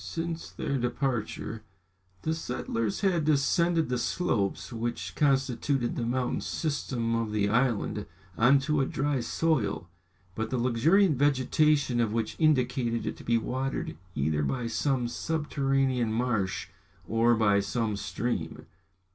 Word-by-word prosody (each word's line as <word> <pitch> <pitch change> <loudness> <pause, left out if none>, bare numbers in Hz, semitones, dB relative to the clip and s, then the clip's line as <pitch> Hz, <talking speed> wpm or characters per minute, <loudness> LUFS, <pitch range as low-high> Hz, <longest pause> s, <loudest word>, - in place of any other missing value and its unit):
Since 165 0 -4
their 140 -1 -2
departure, 120 -3 -2 0.6
the 160 - 0
settlers 115 -8 -2
had 180 -5 +2
descended 160 +3 +2
the 125 -1 0
slopes 120 - -1
which 115 +1 -3
constituted 135 -2 +1
the - - -2
mountain 125 +1 -1
system 130 -7 -2
of 115 -2 -1
the 105 -1 +1
island, 120 -1 0 0.3
on 125 +5 +5
to 150 +1 +1
a 135 - +1
dry 145 -1 0
soil, 115 - 0 0.4
but 110 +3 -3
the 130 - -1
luxuriant 145 - +3
vegetation 145 -1 +2
of 110 -2 +1
which 115 -1 -1
indicated 125 -6 +2
it - - -3
to - - -11
be 115 0 +2
watered 130 +4 -3 0.2
either 75 +2 0
by 120 - -1
some 125 +1 0
subterranean 135 -4 0
marsh 110 -5 -1 0.4
or 115 +2 +3
by 105 -2 +3
some 110 +1 -1
stream. 100 -3 -3
125 Hz, 130 wpm, -28 LUFS, 115-140 Hz, 0.6 s, on